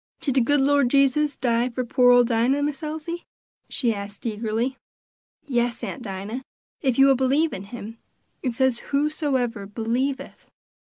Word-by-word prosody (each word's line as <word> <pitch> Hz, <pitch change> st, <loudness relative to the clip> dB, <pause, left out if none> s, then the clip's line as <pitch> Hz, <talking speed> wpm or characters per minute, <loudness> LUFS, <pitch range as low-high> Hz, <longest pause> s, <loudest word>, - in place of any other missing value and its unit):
"Did 275 Hz, -, -1 dB
de 265 Hz, -, +3 dB
good 290 Hz, +4 st, +3 dB
Lord 280 Hz, -2 st, +3 dB
Jesus 280 Hz, +2 st, +3 dB
die 240 Hz, -1 st, +1 dB
for 250 Hz, +1 st, -3 dB
poor 245 Hz, +1 st, +4 dB
ole 245 Hz, 0 st, +7 dB
Dinah, 240 Hz, +4 st, +1 dB
Miss 290 Hz, -2 st, -2 dB
Elsie?" 315 Hz, +2 st, -5 dB, 0.4 s
she 240 Hz, -4 st, 0 dB
asked 200 Hz, +1 st, -8 dB
eagerly. 225 Hz, +4 st, -2 dB, 0.7 s
"Yes, 240 Hz, -3 st, -1 dB
Aunt 275 Hz, -, -5 dB
Dinah, 205 Hz, +3 st, -5 dB, 0.4 s
if 260 Hz, -5 st, +1 dB
you 270 Hz, -, +7 dB
will 275 Hz, -, +6 dB
believe 270 Hz, +5 st, +2 dB
in 195 Hz, -, -6 dB
him; 225 Hz, +1 st, -9 dB, 0.4 s
it 250 Hz, -4 st, -2 dB
says 260 Hz, -1 st, +2 dB
for -, -, -15 dB
whosoever 275 Hz, -7 st, -1 dB
believeth." 240 Hz, +6 st, -3 dB
255 Hz, 160 wpm, -24 LUFS, 230-280 Hz, 0.7 s, ole